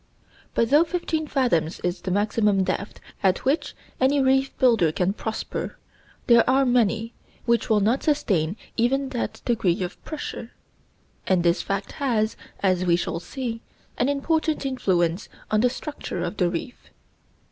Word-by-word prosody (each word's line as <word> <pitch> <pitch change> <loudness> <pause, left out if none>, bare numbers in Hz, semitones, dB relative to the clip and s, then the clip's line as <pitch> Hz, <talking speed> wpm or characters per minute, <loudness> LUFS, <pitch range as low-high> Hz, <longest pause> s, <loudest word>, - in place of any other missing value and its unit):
But 230 +1 +2
though 295 +3 +7
fifteen 325 -2 -2
fathoms 205 - +1
is 180 0 -2
the - - -4
maximum 205 0 +2
depth 200 +2 -3 0.2
at 190 -2 +1
which 280 +6 0 0.2
any 270 +2 +3
reef 265 0 +3
builder 225 -11 +4
can 180 +4 0
prosper, 220 +1 -4 0.5
there 235 -1 +6
are 270 +1 +4
many 230 -2 +1 0.3
which 235 -1 +1
will 215 -2 +4
not 230 +7 +2
sustain 200 - +1 0.2
even 270 +4 +1
that 245 - -4
degree 195 -7 +1
of 180 - -7
pressure; 295 -6 -6 0.7
and 185 -2 +3
this 170 0 +2
fact 195 0 -3
has, 225 -6 0 0.3
as 185 -2 +2
we 175 -2 +3
shall 170 -1 -2
see, 230 +3 -5 0.3
an 250 - +1
important 310 +1 0
influence 185 -9 0 0.2
on 215 0 +3
the 250 - +4
structure 260 - -5
of 180 +4 -4
the 180 -2 +2
reef. 175 +8 -6
225 Hz, 150 wpm, -24 LUFS, 185-265 Hz, 0.7 s, though